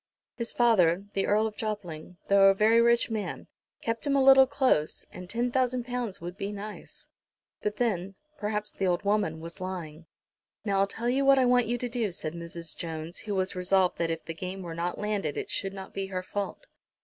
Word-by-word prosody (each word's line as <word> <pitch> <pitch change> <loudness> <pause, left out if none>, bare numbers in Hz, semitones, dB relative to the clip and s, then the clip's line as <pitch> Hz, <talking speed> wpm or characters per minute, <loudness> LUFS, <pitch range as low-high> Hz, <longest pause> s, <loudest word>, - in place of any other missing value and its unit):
His 235 -2 -3
father, 195 -6 +3
the 195 - 0
Earl 215 +2 +3
of 215 -1 -3
Jopling, 180 -6 -5
though 200 0 +6
a 195 - +6
very 220 +3 +5
rich 235 0 +3
man, 215 -2 -3 0.4
kept 230 +4 -2
him 280 - +2
a 275 - +4
little 265 0 +8
close, 260 - +1
and 180 -1 -9
ten 240 +3 0
thousand 255 -1 +1
pounds 245 -5 -3
would 175 +1 -6
be 200 +1 -3
nice. 210 +1 -8 0.5
But 210 0 -2
then, 195 -5 -1 0.2
perhaps 210 0 -2
the 195 - -1
old 175 +1 +1
woman 200 -6 +1
was 170 +2 -9
lying. 170 -4 -6 0.6
"Now 200 -2 +1
I'll 195 - +3
tell 225 +4 -4
you 265 +3 +2
what 275 0 +6
I 260 - +4
want 245 -1 +4
you 240 +2 0
to 245 - -3
do," 235 -4 -1
said 160 -2 -4
Mrs. 170 -1 -7
Jones, 165 +1 -5
who 210 -2 -4
was 185 -1 0
resolved 185 0 +2
that 170 -1 +1
if 165 0 -3
the 165 - -4
game 185 +3 -6
were 170 -2 -6
not 170 +2 -2
landed 205 -7 -2
it - - -4
should 195 - -2
not 195 -1 -9
be 195 0 -3
her 185 -1 -4
fault. 205 - -4
200 Hz, 210 wpm, -28 LUFS, 180-235 Hz, 0.6 s, little